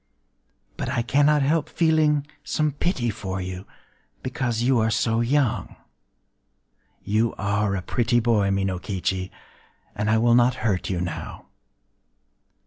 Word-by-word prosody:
But -, -, -3 dB
I 125 Hz, -3 st, 0 dB
cannot 145 Hz, +3 st, +3 dB
help 150 Hz, +2 st, +1 dB
feeling 155 Hz, -3 st, +2 dB, 0.2 s
some 155 Hz, -1 st, 0 dB
pity 135 Hz, -, -1 dB
for 95 Hz, -1 st, -5 dB
you,—because 115 Hz, -, -6 dB
you 125 Hz, -1 st, +3 dB
are 110 Hz, 0 st, +2 dB
so 115 Hz, 0 st, +1 dB
young... 130 Hz, 0 st, 0 dB, 1.3 s
You 110 Hz, +3 st, 0 dB
are 100 Hz, 0 st, 0 dB
a 90 Hz, -, -4 dB
pretty 120 Hz, +2 st, +1 dB
boy, 110 Hz, -4 st, +2 dB
Minokichi; 95 Hz, -1 st, -2 dB, 0.6 s
and 105 Hz, +1 st, -2 dB
I 110 Hz, -, +4 dB
will 120 Hz, +1 st, +3 dB
not 120 Hz, +1 st, +4 dB
hurt 95 Hz, -5 st, 0 dB
you 90 Hz, -2 st, -1 dB
now. 90 Hz, -1 st, -6 dB
115 Hz, 125 wpm, -24 LUFS, 100-135 Hz, 1.3 s, I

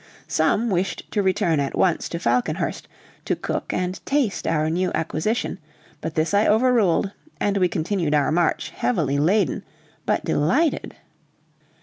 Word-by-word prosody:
Some 205 Hz, +8 st, +1 dB
wished 185 Hz, +1 st, -1 dB
to 210 Hz, -, +1 dB
return 190 Hz, -5 st, +1 dB
at 140 Hz, -1 st, -2 dB
once 180 Hz, -3 st, +1 dB
to 170 Hz, -, -3 dB
Falconhurst, 125 Hz, -7 st, -1 dB, 0.4 s
to -, -, +1 dB
cook -, -, -3 dB
and 185 Hz, +1 st, -2 dB
taste 275 Hz, -7 st, 0 dB
our 155 Hz, -1 st, +1 dB
new 180 Hz, +3 st, 0 dB
acquisition; 170 Hz, +7 st, -1 dB, 0.4 s
but 160 Hz, -, -4 dB
this 160 Hz, +4 st, 0 dB
I 205 Hz, +1 st, +4 dB
overruled, 215 Hz, -5 st, +3 dB, 0.3 s
and 200 Hz, -1 st, +1 dB
we 185 Hz, -2 st, +3 dB
continued 170 Hz, -2 st, -1 dB
our 145 Hz, 0 st, +2 dB
march, 170 Hz, +1 st, +1 dB
heavily 150 Hz, -, 0 dB
laden, 180 Hz, +1 st, +2 dB, 0.4 s
but -, -, +1 dB
delighted. 270 Hz, -, +1 dB
180 Hz, 140 wpm, -23 LUFS, 155-205 Hz, 0.4 s, I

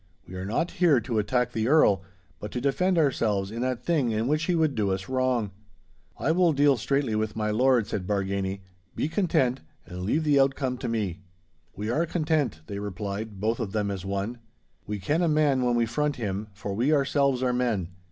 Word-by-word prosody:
We 90 Hz, -, -11 dB
are 95 Hz, 0 st, -5 dB
not 140 Hz, -, -1 dB
here 165 Hz, -8 st, +4 dB
to 115 Hz, -2 st, -1 dB
attack 125 Hz, +3 st, 0 dB
the 110 Hz, -1 st, -1 dB
Earl, 125 Hz, -, +4 dB, 0.4 s
but 105 Hz, -, -6 dB
to 125 Hz, -, -1 dB
defend 175 Hz, +8 st, +1 dB
ourselves 110 Hz, -10 st, +1 dB
in 115 Hz, +2 st, -4 dB
that 125 Hz, -1 st, -2 dB
thing 150 Hz, -8 st, +2 dB
in 110 Hz, +1 st, 0 dB
which 155 Hz, +3 st, +1 dB
he 180 Hz, -, +1 dB
would 160 Hz, -3 st, +2 dB
do 105 Hz, -4 st, 0 dB
us 95 Hz, 0 st, -2 dB
wrong.' 130 Hz, -5 st, 0 dB, 0.7 s
'I 160 Hz, -, +1 dB
will 175 Hz, -1 st, +3 dB
deal 140 Hz, 0 st, +4 dB
straightly 135 Hz, 0 st, 0 dB
with 110 Hz, 0 st, -1 dB
my 105 Hz, -1 st, -1 dB
lord,' 125 Hz, 0 st, +3 dB
said 95 Hz, -3 st, -4 dB
Bargany; 100 Hz, -1 st, -1 dB, 0.3 s
'be -, -, 0 dB
content, 145 Hz, -8 st, +1 dB, 0.2 s
and 90 Hz, +1 st, -7 dB
leave 130 Hz, -, 0 dB
the 145 Hz, -2 st, +4 dB
outcome 135 Hz, -2 st, +1 dB
to 125 Hz, -, -3 dB
me.' 105 Hz, -6 st, -2 dB, 0.6 s
'We 105 Hz, +3 st, -3 dB
are 160 Hz, +7 st, +1 dB
content,' 155 Hz, -, 0 dB
they 100 Hz, +3 st, -5 dB
replied, 100 Hz, +1 st, -5 dB
both 110 Hz, +3 st, 0 dB
of 105 Hz, -4 st, -3 dB
them 105 Hz, -2 st, 0 dB
as 95 Hz, -2 st, -5 dB
one. 100 Hz, +5 st, -3 dB, 0.5 s
'We 105 Hz, -2 st, -4 dB
ken 150 Hz, -, +1 dB
a 175 Hz, -, +2 dB
man 150 Hz, -4 st, +2 dB
when 120 Hz, -1 st, +2 dB
we 120 Hz, -1 st, +2 dB
front 145 Hz, +5 st, -1 dB
him, 105 Hz, -3 st, -3 dB
for 100 Hz, 0 st, -6 dB
we 120 Hz, +9 st, +1 dB
ourselves 140 Hz, -2 st, +2 dB
are 125 Hz, -1 st, +1 dB
men. 115 Hz, -8 st, 0 dB
120 Hz, 205 wpm, -26 LUFS, 105-140 Hz, 0.7 s, here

